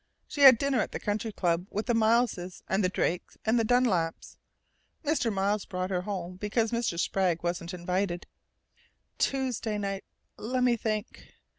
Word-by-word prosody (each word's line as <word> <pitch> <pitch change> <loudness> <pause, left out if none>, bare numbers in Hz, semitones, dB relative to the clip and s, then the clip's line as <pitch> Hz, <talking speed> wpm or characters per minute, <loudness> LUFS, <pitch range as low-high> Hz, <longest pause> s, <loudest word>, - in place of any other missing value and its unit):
She 290 - -4
had 265 -3 +10
dinner 275 0 +1
at - - -4
the - - -3
Country 215 +1 -2
Club 175 -2 0
with 210 +2 -3
the 240 - +1
Mileses 220 -5 +1
and 195 +2 +1
the 185 - +2
Drakes 180 -1 -2
and 225 +2 +3
the - - +2
Dunlaps. 215 -9 +1 0.7
Mr. 285 -6 +1
Miles 200 +1 0
brought 185 0 -3
her 180 -1 0
home, 180 -2 -5
because 215 +3 0
Mr. 230 -8 -1
Sprague 180 -3 0
wasn't 175 0 -2
invited.... 180 0 -2 0.9
Tuesday 250 -5 0
night 195 -1 -3 0.4
let 250 +3 -1
me 245 -1 +4
think!... 215 -1 -4
205 Hz, 160 wpm, -29 LUFS, 180-235 Hz, 0.9 s, had